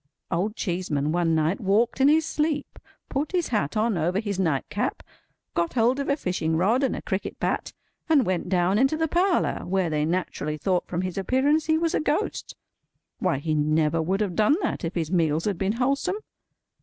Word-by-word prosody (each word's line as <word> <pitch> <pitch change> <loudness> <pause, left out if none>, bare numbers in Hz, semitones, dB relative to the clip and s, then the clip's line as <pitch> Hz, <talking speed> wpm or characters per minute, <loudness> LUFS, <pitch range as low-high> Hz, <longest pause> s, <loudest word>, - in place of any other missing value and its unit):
Old 195 +6 -1
Cheeseman 170 -8 -1
one 170 -1 +1
night 160 +4 +1
walked 220 +6 +1
in 270 - +6
his 310 +1 +4
sleep, 300 -2 -2 0.3
put 290 +5 -2
his 355 -3 0
hat 210 - -1
on 215 -4 +1
over 175 +5 +1
his 205 -3 -3
night 160 -8 0
cap, - - -2 0.5
got 170 -1 0
hold 245 +3 +2
of 280 - -2
a 280 - +2
fishing 170 - -1
rod 215 +9 +2
and 270 - +1
a - - -7
cricket 190 +1 -3
bat, - - -1 0.4
and 290 -6 +4
went 185 -1 -1
down 185 +2 +2
into 270 +4 +3
the 320 0 +1
parlour, 350 +3 +1
where 185 -2 0
they 150 -1 +1
naturally 155 -2 -2
thought 180 +3 0
from 180 +1 -2
his 185 +1 -3
appearance 275 - +2
he 315 0 +3
was 330 0 0
a - - +2
Ghost. 310 +7 -2 0.6
Why, 180 -6 +1
he 155 +3 -2
never 155 +2 +2
would 190 +6 0
have 195 -5 -1
done 215 - +4
that 330 - -2
if 165 +2 -3
his 165 -2 -2
meals 165 -3 +1
had 200 -5 -1
been 195 +1 +1
wholesome. 275 - 0
195 Hz, 200 wpm, -25 LUFS, 170-270 Hz, 0.6 s, in